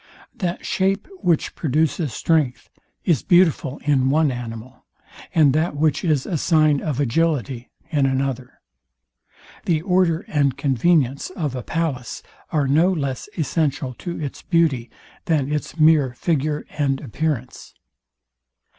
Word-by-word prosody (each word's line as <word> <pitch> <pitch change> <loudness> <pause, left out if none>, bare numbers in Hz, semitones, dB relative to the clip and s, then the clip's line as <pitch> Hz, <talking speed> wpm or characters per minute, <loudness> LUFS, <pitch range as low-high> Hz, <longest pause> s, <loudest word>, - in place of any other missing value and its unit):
That 175 -2 -3
shape, 195 +2 0
which 170 - +1
produces 155 0 0
strength, 145 0 0 0.3
is 165 -9 +2
beautiful 175 -6 +2
in 135 -3 +2
one 150 0 +3
animal; 120 0 -8 0.5
and 150 -5 +5
that 155 +1 0
which 150 +1 +1
is 155 -6 +1
a 165 -5 -2
sign 155 -3 +3
of 145 -4 -2
agility 135 -3 0 0.2
in 145 -4 +2
another. 130 -2 -2 1.1
The 160 -2 +1
order 180 -3 +2
and 140 -3 +1
convenience 140 0 +1
of 155 -7 -4
a 125 - -3
palace 145 -3 -3 0.3
are 150 -3 +1
no 160 +7 +4
less 140 -2 -3
essential 145 -4 -1
to 175 -2 -5
its 145 -3 -5
beauty, 155 -9 +1 0.4
than 150 -3 0
its 150 0 -4
mere 155 -5 +4
figure 150 0 -1
and 135 -2 +1
appearance. 140 -1 -4
150 Hz, 130 wpm, -22 LUFS, 135-165 Hz, 1.1 s, and